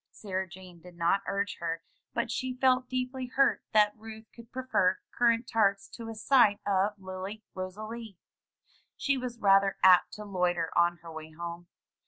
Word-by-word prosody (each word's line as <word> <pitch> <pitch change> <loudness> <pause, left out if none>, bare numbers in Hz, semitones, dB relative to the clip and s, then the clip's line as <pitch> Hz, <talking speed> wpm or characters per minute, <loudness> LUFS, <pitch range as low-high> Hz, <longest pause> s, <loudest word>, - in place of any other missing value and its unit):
Sarah 190 -2 -4
Jane 180 -1 -13
did 180 0 -14
not 170 +4 +2
urge 200 0 -2
her, 165 -1 -3 0.3
but 235 -1 -2
she 255 +2 -2
felt 255 -1 +3
deeply 255 0 -3
hurt 270 +2 +2
that 210 -1 +4
Ruth 220 0 -10
could 235 0 -14
prefer 255 -8 +1 0.2
currant 235 0 +3
tarts 200 -3 +2
to 230 -1 -8
a 225 - -6
sight 215 -2 +4
of 200 +1 +1
Lily 190 +3 -7
Rosalie. 215 +3 -7 0.8
She 275 - +1
was 250 -2 -4
rather 195 -2 +4
apt 180 -1 +6
to 210 0 -7
loiter 180 -4 -1
on 175 0 +3
her 165 - -9
way 160 0 -8
home. 170 +1 -7
200 Hz, 165 wpm, -29 LUFS, 185-235 Hz, 0.8 s, apt